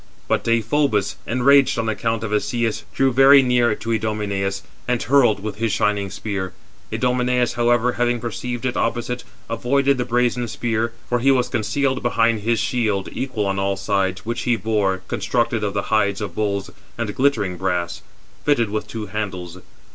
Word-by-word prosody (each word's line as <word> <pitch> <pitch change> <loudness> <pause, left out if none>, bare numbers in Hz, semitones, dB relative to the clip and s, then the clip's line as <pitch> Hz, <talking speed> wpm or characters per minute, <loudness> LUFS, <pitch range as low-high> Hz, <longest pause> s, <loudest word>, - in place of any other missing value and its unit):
But - - +1
Deïphobus, 115 -3 +1
enraged 135 +3 +4
on 115 -1 -1
account 115 0 -1
of 110 -1 -3
Asius, 115 +1 -1
drew 135 -1 +2
very 135 +2 +7
near 120 -3 +2
to 115 - -5
Idomeneus, 105 -3 -1 0.2
and 125 -1 0
hurled 120 -7 +3
with 105 -2 -4
his 115 0 0
shining 100 -1 0
spear. 95 -2 -4 0.4
Idomeneus, 125 -1 +1
however, 120 0 +2
having 120 0 0
perceived 120 +1 -4
it 130 - -1
opposite, 120 +1 -1 0.2
avoided 135 +4 +1
the - - +2
brazen 120 0 0
spear, 115 0 -1 0.2
for 120 - +1
he 135 +3 +3
was 125 -2 +3
concealed 130 +3 0
behind 115 -2 +2
his 115 +2 0
shield 110 -5 0
equal 130 -6 -2
on 100 0 -1
all 95 0 0
sides, 95 -1 -1
which 120 +2 -2
he 120 - +2
bore, 105 -4 0
constructed 120 -2 0
of 100 -1 -2
the 100 - 0
hides 100 -2 +2
of 105 - -4
bulls, 100 -2 -2 0.3
and 110 -3 -2
glittering 110 -9 +1
brass, 90 -2 -2 0.4
fitted 120 -8 +2
with 105 -1 -3
two 110 0 -5
handles. 95 -4 -5
115 Hz, 165 wpm, -21 LUFS, 105-125 Hz, 0.4 s, very